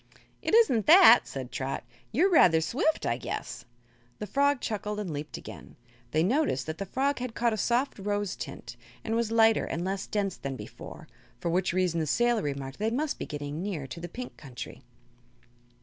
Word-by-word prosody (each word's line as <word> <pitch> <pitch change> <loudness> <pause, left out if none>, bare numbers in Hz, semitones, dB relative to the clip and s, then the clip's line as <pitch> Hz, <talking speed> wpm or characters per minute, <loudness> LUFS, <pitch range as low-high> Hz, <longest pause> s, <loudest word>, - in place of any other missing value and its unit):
"It - - +1
isn't 260 - +4
that," 330 -7 +8
said 130 -2 -6
Trot. 135 0 -3 0.3
"You 290 - +3
are - - +4
rather 175 - +6
swift, 260 - 0
I 115 - 0
guess." - - -5 0.5
The - - -5
frog 280 +6 +2
chuckled 210 -2 -3
and 195 -5 -4
leaped 150 +1 -5
again. - - -11 0.3
They 155 +4 +2
noticed 230 - +1
that 160 0 -5
the 195 - -4
fog 275 +6 0
had 250 -2 -5
caught 235 -1 +1
a - - -2
soft 240 +4 0
rose 205 -1 -2
tint, - - -8 0.3
and 225 - -2
was 230 -1 0
lighter 225 -1 +4
and 170 +2 -3
less 195 +1 -3
dense 200 -3 -1
than 135 -1 -5
before, - - -10 0.3
for 170 - -2
which 185 +2 +1
reason 180 -2 +1
the 155 - -1
sailor 240 +7 +2
remarked 140 -1 -5
that 215 +2 +1
they 230 - -2
must 300 +2 -2
be - - -4
getting 145 +1 -5
near 185 -8 -3
to 135 +6 -8
the 175 +1 -7
Pink 250 +6 -8
Country. 135 -3 -9
205 Hz, 195 wpm, -28 LUFS, 160-240 Hz, 0.5 s, that